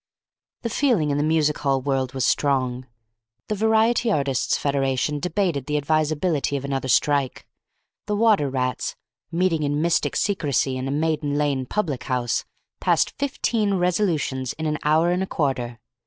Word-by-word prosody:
The 230 Hz, -, -1 dB
feeling 215 Hz, -, +2 dB
in 140 Hz, -, 0 dB
the -, -, +1 dB
music 155 Hz, -1 st, +2 dB
hall 140 Hz, -2 st, +1 dB
world 135 Hz, -1 st, -1 dB
was 130 Hz, -, 0 dB
strong. 130 Hz, -3 st, 0 dB, 0.6 s
The -, -, +1 dB
Variety 220 Hz, +2 st, +2 dB
Artists' 140 Hz, -, +1 dB
Federation 140 Hz, +1 st, 0 dB
debated 175 Hz, -5 st, -1 dB
the 150 Hz, 0 st, 0 dB
advisability 155 Hz, 0 st, 0 dB
of 140 Hz, -, -5 dB
another 135 Hz, -1 st, -2 dB
strike. 140 Hz, +1 st, +1 dB, 0.6 s
The 210 Hz, -, 0 dB
Water 205 Hz, -10 st, +3 dB
Rats, 130 Hz, -2 st, -2 dB, 0.4 s
meeting 170 Hz, -2 st, +1 dB
in 145 Hz, 0 st, 0 dB
mystic 170 Hz, +1 st, +1 dB
secrecy 145 Hz, -9 st, 0 dB
in 130 Hz, +1 st, -3 dB
a -, -, -2 dB
Maiden 150 Hz, -1 st, 0 dB
Lane 140 Hz, -3 st, 0 dB
public 155 Hz, -10 st, -2 dB
house, 125 Hz, -2 st, -1 dB, 0.3 s
passed -, -, +2 dB
fifteen 230 Hz, -7 st, 0 dB
resolutions 170 Hz, -, 0 dB
in 160 Hz, -, -5 dB
an 150 Hz, 0 st, -1 dB
hour 160 Hz, +3 st, +3 dB
and 180 Hz, +1 st, 0 dB
a 190 Hz, -, -1 dB
quarter. 125 Hz, -8 st, -2 dB
150 Hz, 155 wpm, -23 LUFS, 135-180 Hz, 0.6 s, Water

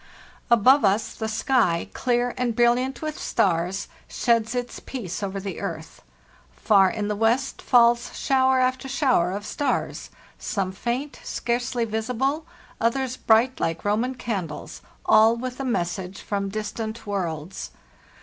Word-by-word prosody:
Above 250 Hz, +5 st, +6 dB
us 200 Hz, +2 st, +2 dB
the 220 Hz, -, -4 dB
sky, 220 Hz, -6 st, +1 dB
clear 245 Hz, -1 st, 0 dB
and 245 Hz, -2 st, -1 dB
brilliant 245 Hz, +3 st, +2 dB
with 310 Hz, -1 st, -4 dB
stars, 175 Hz, +4 st, 0 dB, 0.2 s
sheds 230 Hz, -1 st, +1 dB
its 245 Hz, -1 st, -3 dB
peace 215 Hz, -10 st, -6 dB
over 195 Hz, -1 st, -3 dB
the 195 Hz, -3 st, -5 dB
earth; -, -, -6 dB, 0.5 s
far 190 Hz, -, +4 dB
in 210 Hz, 0 st, -3 dB
the 210 Hz, -, -1 dB
west 230 Hz, +5 st, +1 dB
falls 235 Hz, -1 st, +4 dB
shower 260 Hz, -1 st, +3 dB
after 255 Hz, +1 st, 0 dB
shower 260 Hz, -, +2 dB
of 205 Hz, +2 st, -5 dB
stars, 290 Hz, -, -2 dB, 0.3 s
some 195 Hz, -3 st, -2 dB
faint, 240 Hz, +8 st, -3 dB
scarcely 240 Hz, 0 st, -1 dB
visible, 250 Hz, +8 st, -1 dB, 0.3 s
others 255 Hz, +2 st, 0 dB
bright 235 Hz, +3 st, +3 dB
lke 165 Hz, 0 st, -2 dB
Roman 225 Hz, +6 st, 0 dB
candles, 195 Hz, -11 st, -5 dB, 0.2 s
all 220 Hz, +2 st, +6 dB
with 255 Hz, +1 st, -5 dB
a -, -, -2 dB
message 185 Hz, -5 st, -2 dB
from 200 Hz, -1 st, -2 dB
distant 220 Hz, +2 st, -5 dB
worlds. 180 Hz, -3 st, -4 dB
230 Hz, 135 wpm, -24 LUFS, 200-255 Hz, 0.5 s, Above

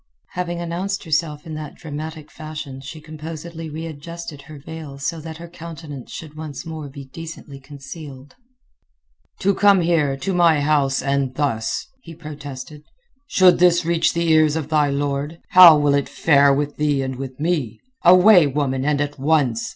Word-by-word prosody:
Having 175 Hz, -1 st, -4 dB
announced 180 Hz, +3 st, -3 dB
herself 155 Hz, -2 st, -1 dB
in 160 Hz, -, -7 dB
that 155 Hz, -1 st, -7 dB
dramatic 155 Hz, 0 st, -7 dB
fashion 150 Hz, -4 st, -8 dB
she 150 Hz, +4 st, -9 dB
composedly 160 Hz, +1 st, -8 dB
readjusted 160 Hz, 0 st, -7 dB
her 150 Hz, +2 st, -12 dB
veil 145 Hz, -1 st, -9 dB
so 140 Hz, +4 st, -3 dB
that 160 Hz, 0 st, -8 dB
her 170 Hz, +1 st, -9 dB
countenance 160 Hz, -5 st, -9 dB
should 155 Hz, -2 st, -9 dB
once 150 Hz, -3 st, -7 dB
more 160 Hz, -3 st, -7 dB
be 140 Hz, 0 st, -10 dB
decently 155 Hz, -1 st, -10 dB
concealed. 140 Hz, 0 st, -11 dB, 1.1 s
"To 200 Hz, +1 st, +3 dB
come 200 Hz, -1 st, +4 dB
here, 155 Hz, -5 st, +1 dB
to 190 Hz, +8 st, -3 dB
my 170 Hz, -4 st, +4 dB
house, 145 Hz, -2 st, +1 dB
and 140 Hz, -2 st, -1 dB
thus!" 125 Hz, -7 st, -1 dB, 0.2 s
he 165 Hz, -8 st, -11 dB
protested. 150 Hz, -2 st, -9 dB, 0.5 s
"Should 185 Hz, -8 st, +5 dB
this 175 Hz, -1 st, +4 dB
reach 170 Hz, 0 st, +2 dB
the 170 Hz, -1 st, +1 dB
ears 155 Hz, -1 st, +4 dB
of 155 Hz, -2 st, -3 dB
thy 150 Hz, -2 st, +2 dB
lord, 140 Hz, +2 st, -2 dB
how 175 Hz, -4 st, +9 dB
will 145 Hz, -1 st, +2 dB
it 140 Hz, -1 st, 0 dB
fare 140 Hz, -3 st, +4 dB
with 145 Hz, +1 st, -1 dB
thee 145 Hz, -2 st, +1 dB
and 130 Hz, -1 st, -4 dB
with 130 Hz, 0 st, -7 dB
me? 150 Hz, -9 st, -1 dB, 0.2 s
Away, 180 Hz, -1 st, +7 dB
woman, 135 Hz, -2 st, -1 dB
and 145 Hz, 0 st, +1 dB
at 145 Hz, -1 st, -3 dB
once!" 135 Hz, -6 st, +1 dB
150 Hz, 165 wpm, -21 LUFS, 140-165 Hz, 1.1 s, how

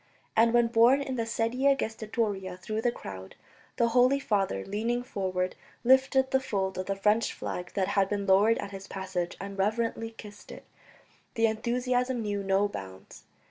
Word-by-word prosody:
And 230 Hz, +1 st, +5 dB
when, 240 Hz, 0 st, +4 dB
borne 235 Hz, +4 st, +4 dB
in 270 Hz, -1 st, -4 dB
the 230 Hz, -2 st, -2 dB
sedia 250 Hz, +5 st, +2 dB
gestatoria 215 Hz, -5 st, -3 dB
through 215 Hz, +4 st, -4 dB
the 240 Hz, -, +2 dB
crowd, 95 Hz, -, -9 dB, 0.4 s
the 235 Hz, -, +2 dB
Holy 250 Hz, +3 st, +4 dB
Father, 195 Hz, -, -1 dB
leaning 235 Hz, +4 st, -1 dB
forward, 185 Hz, -5 st, -2 dB, 0.3 s
lifted 265 Hz, +1 st, +4 dB
the 265 Hz, -, +4 dB
fold 190 Hz, -7 st, -2 dB
of 185 Hz, -, -4 dB
the 195 Hz, -, -1 dB
French 210 Hz, +3 st, +2 dB
flag 180 Hz, 0 st, -5 dB
that 195 Hz, -1 st, 0 dB
had 195 Hz, -1 st, +2 dB
been 205 Hz, -1 st, -2 dB
lowered 200 Hz, +4 st, +4 dB
at 200 Hz, -, -5 dB
his 195 Hz, 0 st, -8 dB
passage 185 Hz, -3 st, -4 dB
and 195 Hz, +1 st, -7 dB
reverently 225 Hz, +2 st, 0 dB
kissed 205 Hz, -1 st, -11 dB
it, -, -, -11 dB, 0.7 s
the 225 Hz, -1 st, +3 dB
enthusiasm 245 Hz, +2 st, 0 dB
knew 205 Hz, -1 st, -2 dB
no 195 Hz, +1 st, +2 dB
bounds. 95 Hz, -, -10 dB
215 Hz, 170 wpm, -28 LUFS, 195-235 Hz, 0.7 s, And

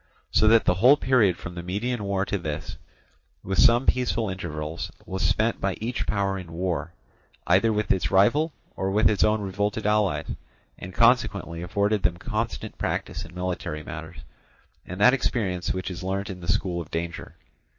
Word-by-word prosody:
So 110 Hz, -, +4 dB
that 115 Hz, 0 st, +5 dB
the 90 Hz, -, +4 dB
whole 125 Hz, +11 st, +6 dB
period 120 Hz, -, +3 dB
from 85 Hz, -, -8 dB
the 85 Hz, -, -6 dB
Median 105 Hz, +6 st, -2 dB
war 100 Hz, -1 st, 0 dB
to 100 Hz, -, -2 dB
this, 80 Hz, -2 st, -5 dB, 0.7 s
with 95 Hz, +1 st, -2 dB
some 120 Hz, +1 st, +5 dB
peaceful 115 Hz, -4 st, +1 dB
intervals, 80 Hz, -3 st, -5 dB, 0.2 s
was 95 Hz, 0 st, -4 dB
spent 110 Hz, +2 st, +1 dB
by 100 Hz, -2 st, 0 dB
each 120 Hz, +2 st, -3 dB
power 100 Hz, -1 st, 0 dB
in 90 Hz, -3 st, -10 dB
war, 85 Hz, -2 st, -2 dB, 0.5 s
either 95 Hz, +6 st, +4 dB
with 105 Hz, 0 st, 0 dB
its 95 Hz, -, +1 dB
rival, 130 Hz, +12 st, +3 dB, 0.2 s
or 95 Hz, -, -1 dB
with 105 Hz, +2 st, +3 dB
its 105 Hz, -, +3 dB
own 110 Hz, 0 st, +2 dB
revolted 100 Hz, +2 st, -2 dB
allies, 105 Hz, -2 st, +1 dB, 0.5 s
and 95 Hz, -, -7 dB
consequently 100 Hz, -6 st, +2 dB
afforded 100 Hz, +4 st, 0 dB
them 85 Hz, -, +1 dB
constant 110 Hz, +5 st, -4 dB
practice -, -, -2 dB
in 85 Hz, -, -14 dB
military 90 Hz, -4 st, -3 dB
matters, -, -, -8 dB, 0.7 s
and 90 Hz, +2 st, -7 dB
that 125 Hz, +5 st, +6 dB
experience 95 Hz, -9 st, -1 dB
which 95 Hz, 0 st, -3 dB
is 90 Hz, -, -7 dB
learnt 95 Hz, +1 st, -3 dB
in 90 Hz, -, -8 dB
the 85 Hz, +2 st, -1 dB
school 90 Hz, -3 st, -1 dB
of 80 Hz, -, -10 dB
danger. 85 Hz, 0 st, -5 dB
95 Hz, 175 wpm, -25 LUFS, 90-110 Hz, 0.7 s, whole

